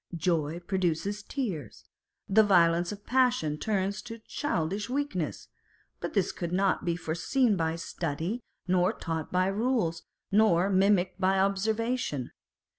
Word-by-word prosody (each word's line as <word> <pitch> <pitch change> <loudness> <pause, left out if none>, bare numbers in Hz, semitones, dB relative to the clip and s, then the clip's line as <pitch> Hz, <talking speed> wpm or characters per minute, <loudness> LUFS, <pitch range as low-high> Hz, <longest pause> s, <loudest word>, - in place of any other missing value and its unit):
Joy 165 -1 0
produces 190 +2 -1
tears: 185 - -5 0.4
the 210 +3 +6
violence 175 -4 +4
of 205 0 -9
passion 245 -13 +2
turns 200 -1 -1
to 230 -1 -8
childish 205 - -2
weakness; 255 - -2 0.5
but - - -4
this - - +2
could 170 -1 -5
not 190 +1 +1
be 170 -1 0
foreseen 190 - +1
by 165 -2 0
study, 165 +5 -3 0.3
nor 180 0 +3
taught 160 -3 -4
by 185 0 +2
rules, 195 -4 0 0.3
nor 200 -3 +4
mimicked 190 -1 +2
by 190 +1 +3
observation. 200 - 0
190 Hz, 125 wpm, -29 LUFS, 170-215 Hz, 0.5 s, the